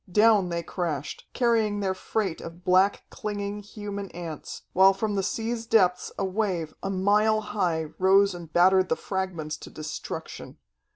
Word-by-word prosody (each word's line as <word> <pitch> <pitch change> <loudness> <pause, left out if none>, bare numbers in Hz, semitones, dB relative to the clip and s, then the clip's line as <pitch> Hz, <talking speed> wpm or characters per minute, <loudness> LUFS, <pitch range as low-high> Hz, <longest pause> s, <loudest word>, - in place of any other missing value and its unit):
Down 210 -2 +5
they 170 0 -2
crashed, 155 -6 -4
carrying 225 -4 +1
their 195 -2 0
freight 190 -1 -2
of 170 +2 -10
black, 185 +2 +3
clinging, 205 -1 -4
human 205 -1 -6
ants, 165 -3 -7
while 190 +1 +6
from 210 +1 -1
the 195 - +1
sea's 225 +3 -3
depths 180 -5 +3
a 195 - 0
wave, 185 -5 -1
a 195 - -3
mile 205 +3 +3
high, 180 -6 -1
rose 195 +1 +5
and 170 -3 -9
battered 185 +2 +4
the - - +2
fragments 175 -6 -3
to - - -11
destruction. 155 0 -7
190 Hz, 155 wpm, -26 LUFS, 175-210 Hz, -, while